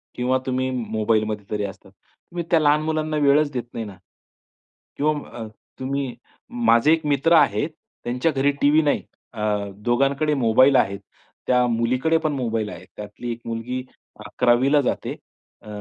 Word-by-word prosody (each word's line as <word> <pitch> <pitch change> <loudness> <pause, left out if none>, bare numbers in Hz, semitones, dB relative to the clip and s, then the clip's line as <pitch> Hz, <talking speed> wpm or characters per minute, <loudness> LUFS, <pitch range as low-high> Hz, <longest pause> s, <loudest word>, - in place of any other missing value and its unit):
किंवा 125 +1 +1
तुम्ही 130 0 0
मोबाईलमध्ये 110 -3 -1
तरी 105 -1 -1
असतात. 95 -1 -10
तुम्ही 170 - -10
त्या 165 - +5
लहान 150 0 +3
मुलांना 155 -1 -1
वेळच 145 0 +3
देत 125 -2 -2
नाही 115 -1 -4
ना 100 -3 -10 1.0
किंवा 155 +2 +2 0.3
अ, 110 - -5 0.3
तुम्ही 135 -1 -3 0.5
माझे 115 - +5
एक 165 -1 -1
मित्र 145 +3 +2
आहेत, 145 -2 +3 0.3
त्यांच्या 125 +7 0
घरी 140 0 +2
टीव्ही 150 +2 +5
नाही 145 -2 0 0.3
अ, 105 -2 -1
दोघांकडे 135 +7 +1
मोबाईल 130 +1 +4
आहेत. 100 -5 +2 0.5
त्या 125 -1 +3
मुलीकडे 125 +7 +1
पण 155 - +2
मोबाईल 115 -5 -2
आहे. - - -10
त्यातली 105 +3 -6
एक 120 0 -6
मुलगी 120 +3 -4 0.4
11वीला 125 +4 +3
जाते. 130 - -2 0.5
अ, - - -17
125 Hz, 150 wpm, -23 LUFS, 115-145 Hz, 1.0 s, त्या